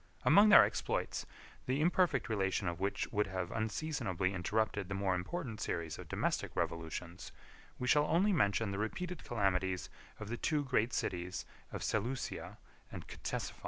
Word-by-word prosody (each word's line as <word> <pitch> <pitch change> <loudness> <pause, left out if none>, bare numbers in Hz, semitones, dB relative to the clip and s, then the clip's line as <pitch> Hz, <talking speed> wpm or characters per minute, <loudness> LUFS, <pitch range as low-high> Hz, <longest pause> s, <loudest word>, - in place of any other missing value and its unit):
Among 210 +1 +7
their - - +10
exploits, - - -2 0.4
the 130 +2 +1
imperfect 170 -4 +2
relation 95 -2 0
of 85 0 -2
which 100 +1 -1
would 105 0 +1
have 95 -2 -3
unseasonably 110 - -1
interrupted 105 +1 -1
the 95 - -2
more 95 -1 +1
important 110 - -4
series 85 -5 -3
of - - -8
domestic - - -1
revolutions, 85 +2 -4 0.5
we 125 - -3
shall 150 +3 +4
only 195 +5 +3
mention 100 - +2
the 100 - -3
repeated 175 +11 -3
calamities 95 -4 0 0.3
of 110 -1 -6
the 120 - -3
two 150 +4 +1
great 125 -3 +1
cities 90 +1 -2 0.3
of - - -5
Seleucia 120 +5 -2 0.3
and - - -8
Ctesiphon. - - -4
105 Hz, 155 wpm, -34 LUFS, 95-130 Hz, 0.5 s, their